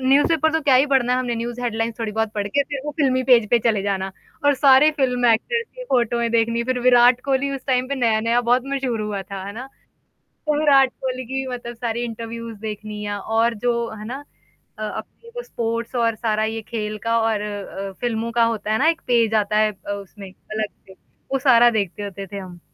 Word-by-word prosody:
News 270 +2 +4
paper 315 -1 +2
तो 320 - +1
क्या 275 -3 +4
ही 265 +3 +5
पढ़ना 265 -3 +2
है 250 - +2
हमने 245 -2 -1
न्यूज़ 235 +1 -4
हेडलाइन्स 225 -1 -2
थोड़ी 225 -2 -3
बहुत 220 0 -1
पढ़ 205 -1 -2
के 280 +8 +2
फिर 280 -1 -5
वो 295 - -2
फ़िल्मी 260 -3 +2
पेज 235 -5 +5
पे 240 - +5
चले 220 -3 +1
जाना 195 -1 -2 0.3
और 285 - +5
सारे 275 +2 +6
फ़िल्म 250 -3 +1
एक्टर्स 455 - +2
की - - -7
फ़ोटोएँ 235 - +1
देखनी, 230 0 +1
फिर 255 0 -1
विराट 245 0 +5
कोहली 275 0 +1
उस 270 - -7
टाइम 255 -1 +1
पे 280 - -1
नया-नया 230 -1 +2
बहुत 245 +1 +2
मशहूर 265 -5 -2
हुआ 210 -2 -3
था, 195 0 -7
है 200 - -6
ना? 250 +4 -7 0.8
तो 300 -1 +1
विराट 275 -3 +5
कोहली 255 -1 -3
की 260 - -7
भी 265 0 -2
मतलब 240 -1 -7
सारे 235 0 -3
इंटरव्यूज़ 230 0 -6
देखनी 210 -1 -6
और 225 +3 0
जो, 235 +1 -1
है 210 - -8
ना? 270 +5 -6 0.5
अ, 215 - -5
अपने 465 - -7
वो 485 - -3
स्पोर्ट्स 230 - -3
और 230 -2 +1
सारा 215 -1 0
ये 220 +1 -2
खेल 215 -2 -3
का 230 0 +3
और 220 -2 +1
अ, 200 -1 -5
फ़िल्मों 230 -1 -1
का 235 0 +3
होता 220 -2 -1
है 220 - +2
ना, 300 - +3
एक 330 0 -1
पेज 230 -3 +3
आता 210 +1 -1
है 215 0 +3
अ, 205 0 -9
उसमें 200 0 -9
अलग 215 +3 -5 0.2
से, 190 - -13 0.4
वो 270 - +1
सारा 240 -3 +6
देखते 200 +1 -4
होते 195 -1 -6
थे 200 - -7
हम। 180 -3 -9
235 Hz, 220 wpm, -22 LUFS, 215-260 Hz, 0.8 s, सारे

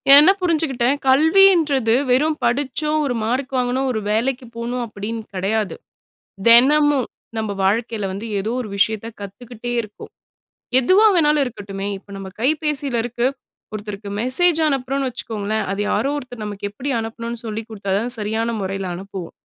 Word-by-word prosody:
என்ன 295 +5 +9
புரிஞ்சுக்கிட்டேன். 290 -7 +1
கல்வின்றது 310 - +5 0.2
வெறும் 300 +5 +2
படிச்சோம் 290 +4 0
ஒரு 250 -3 -1
மார்க் 255 +5 -1
வாங்கணும், 250 +2 0
ஒரு 220 - -1
வேலைக்கு 250 +4 0
போணும் 240 +1 -3
அப்படின்னு 220 +2 -5
கிடையாது. 200 +2 -1 0.7
தினமும் 275 +3 +6 0.3
நம்ம 220 -2 -2
வாழ்க்கையில 220 +1 0
வந்து 200 +4 -6
ஏதோ 215 +3 -2
ஒரு 220 - -7
விஷயத்த 220 +2 +1
கத்துக்கிட்டே 235 +4 -7
இருக்கோம். 210 -2 -12 0.7
எதுவா 370 - +5
வேணாலும் 300 -3 +4
இருக்கட்டுமே 200 -4 -6
இப்ப 195 - -20
நம்ம 195 -1 -7
கைபேசியில 285 -2 0
இருக்கு, 240 +1 0 0.5
ஒருத்தருக்கு 205 -1 -6
மெசேஜ் 325 +7 +2
அனுப்புறோன்னு 270 -1 -1
வச்சுக்கோங்களேன். 220 -2 -3
அத 195 - -3
யாரோ 275 - +1
ஒருத்தர் 245 -4 -9
நமக்கு 205 -1 -5
எப்படி 255 +7 -4
அனுப்பணும்னு 230 +1 -5
சொல்லிக் 220 0 -5
குடுத்தா 200 -3 -5
தான் 240 +3 -2
சரியான 220 +2 -1
முறையில 195 0 -3
அனுப்புவோம். 190 -1 -7
235 Hz, 140 wpm, -20 LUFS, 210-275 Hz, 0.7 s, என்ன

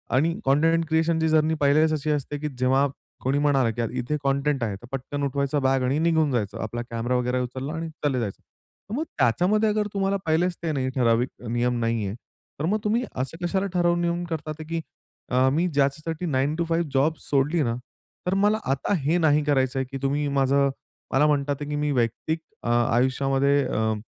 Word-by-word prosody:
आणि 160 +6 +3
content 165 +5 +3
क्रिएशनची 160 0 +2
journey 155 0 +3
पहिल्याच 155 +3 +4
अशी 155 0 -2
असते 145 0 -2
की 150 - -2
जेव्हा 130 +2 +3 0.4
कोणी 135 +2 +1
म्हणाला 140 -5 +3
की 120 - -3
यार 115 - -1
इथे 125 +4 -2
कंटेंट 140 -1 +1
आहे, 105 -3 -1
तर 110 +5 -12
पटकन 135 +2 -4
उठवायचा 140 +1 0
बॅग 135 -1 +2
आणि 130 +3 +1
निघून 160 -2 +2
जायचं. 110 -6 -1
आपला 120 +2 -4
कॅमेरा 115 +2 -1
वगैरा 125 +1 0
उचलला 130 +4 -4
आणि 165 0 -4
चालले 145 -4 -2
जायचं. 105 -5 -4 0.5
तर 215 - -3
मग 300 - 0
त्याच्यामध्ये 180 - +3
अगर 210 0 0
तुम्हाला 195 0 +1
पाहिलेच 170 +3 +1
ते 165 - 0
नाही 130 -3 -1
ठराविक 120 -1 +2
अ, - - -7
नियम 120 +1 0
नाही 115 -2 0
आहे, 95 - -4 0.4
तर 150 - -1
मग 210 +6 +1
तुम्ही 225 +4 +1
असं 135 +7 -4
कशाला 190 +2 0
ठरवून 175 -1 +2
नियम 170 0 0
करतात 155 -2 -3
आहे 155 - -8
की 165 0 -1 0.5
अ, 130 +1 +3
मी 170 +4 +2
ज्याच्यासाठी 155 +3 -1
9 145 -1 0
टू 170 +1 -1
5 165 -1 0
जॉब 140 +4 +3
सोडली 145 +4 +1
ना, 115 -3 -1 0.5
तर 180 - +2
मला 205 +2 +3
आता 140 +8 0
हे 150 +5 +1
नाही 150 -3 +3
करायचय 135 -2 +1
की 135 - -3
तुम्ही 145 +2 0
माझं 140 0 +2 0.4
मला 135 +3 +4
म्हणतात 145 -1 +1
आहे 145 - -4
की 150 - -2
मी 150 0 0
वैयक्तिक 125 +5 0 0.2
अ, - - -2
आयुष्यामध्ये 135 +4 +2
अ, 110 -2 0
145 Hz, 200 wpm, -25 LUFS, 130-160 Hz, 0.5 s, पहिल्याच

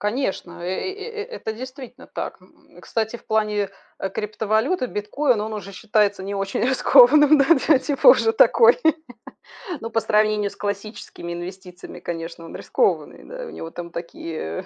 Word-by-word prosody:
Конечно, 210 -6 -3
э - - -6
э 190 - -2
э 425 +1 -6
э - - -7
это 475 - -6
действительно 255 +2 -10
так. - - -6
М, - - -21
кстати, 225 +1 -3
в - - -21
плане, 210 -2 0 0.3
э, 195 - -3
криптовалюты 220 - -1
биткоин 235 +3 0
он 215 +1 -4
уже 200 -2 -7
считается 210 -1 +1
не 200 +1 -4
очень 195 0 -2
рискованным, 265 +3 +6
ну 275 - +5 0.2
да, 295 -5 +6
типа, 285 - -1
уже 475 -2 +6
такой. 475 +1 +5 1.0
Ну, 230 - -6
по 225 - +1
сравнению 210 -1 +1
с - - -15
классическими 200 -3 -6
инвестициями, 180 +1 -9
конечно, 165 0 -6
он - - -11
рискованный, 470 - -1
да. - - -8
У - - -8
него 165 - -8
там 170 0 -8
такие 165 - -6
215 Hz, 165 wpm, -22 LUFS, 195-265 Hz, 1.0 s, рискованным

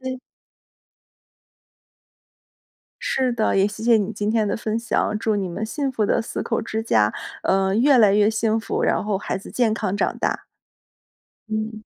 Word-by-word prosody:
所 260 - -5
以 255 0 -4 2.8
是 260 -2 0
的， 220 -3 +1
也 195 +1 +4
谢 215 +1 -8
谢 235 -1 +5
你 205 +1 -1
今 210 0 -2
天 220 -2 +1
的 - - -1
分 220 0 -2
享， 225 -2 0
祝 220 -2 0
你 195 -2 -1
们 205 +6 -4
幸 275 +3 -2
福 220 -4 0
的 - - +1
四 - - -5
口 230 - -1
之 220 0 -3
家， 105 - +2 0.3
呃， 190 0 +2
越 265 +4 +5
来 210 -4 +5
越 210 +1 +4
幸 220 0 0
福， - - -3
然 - - +1
后 205 -2 -1
孩 190 - -3
子 195 - -11
健 230 -4 +1
康 210 -3 -2
长 - - -1
大。 - - -2 1.0
嗯。 215 0 -4
220 Hz, 190 characters per minute, -22 LUFS, 205-230 Hz, 2.8 s, 谢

